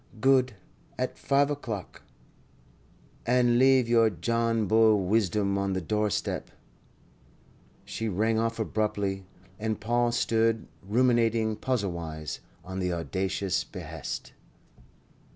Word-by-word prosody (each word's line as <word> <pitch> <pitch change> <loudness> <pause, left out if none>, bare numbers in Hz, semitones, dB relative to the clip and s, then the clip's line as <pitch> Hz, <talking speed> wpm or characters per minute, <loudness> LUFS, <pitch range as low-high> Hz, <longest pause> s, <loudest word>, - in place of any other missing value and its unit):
"Good. 130 -1 +4 0.4
At - - -3
five 140 +1 +2
o'clock. 115 -10 -5 1.2
And 120 0 +3
leave 130 -2 +5
your 115 -1 +4
John 115 +4 0
Bull 110 -2 +4
wisdom 100 -1 +1
on 100 0 -1
the 95 - 0
doorstep." 105 +4 -1 1.4
She 110 0 -3
rang 110 +3 +1
off 115 0 -1
abruptly, 100 -3 -1 0.3
and 110 -1 -2
Paul 120 +2 +1
stood 115 -1 +1 0.2
ruminating 115 0 +2
puzzlewise 85 - -3 0.3
on 95 +1 -5
the 90 -1 0
audacious 95 +2 -1
behest. 80 -4 -7
110 Hz, 100 wpm, -28 LUFS, 95-115 Hz, 1.4 s, leave